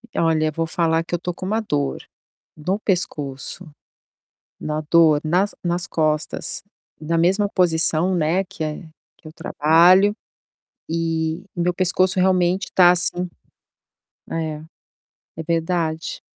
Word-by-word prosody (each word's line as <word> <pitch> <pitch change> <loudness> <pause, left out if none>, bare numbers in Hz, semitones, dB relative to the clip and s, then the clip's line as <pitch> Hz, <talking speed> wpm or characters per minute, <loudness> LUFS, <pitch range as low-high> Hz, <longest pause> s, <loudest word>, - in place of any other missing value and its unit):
Olha 155 -1 +1
vou 165 +2 -2
falar 165 -1 0
que 170 - -11
eu - - +2
estou 175 +1 -4
com 185 - -8
uma 215 +4 0
dor 145 -9 -2 0.5
no 180 +6 -2
pescoço, 165 -4 -4 0.9
uma 155 0 -3
dor 160 -3 +5
nas 180 +6 0
nas 175 +1 -1
costas, 155 -1 -1 0.4
na 165 +2 -2
mesma 190 +5 +2
posição, 175 -1 +3
né, 170 +3 +1
que 180 -3 -7
é 155 -1 -4 0.4
que 155 - -15
eu 155 - -11
trabalho, 175 +7 +4 0.7
e 165 +1 -2
meu 175 0 0
pescoço 185 +1 +1
realmente 185 0 +1
tá, 180 -2 +7
assim 180 0 0 1.0
É, 155 -2 -4 0.7
é 160 - -5
verdade. 165 -1 -2
170 Hz, 125 wpm, -21 LUFS, 160-180 Hz, 1.0 s, tá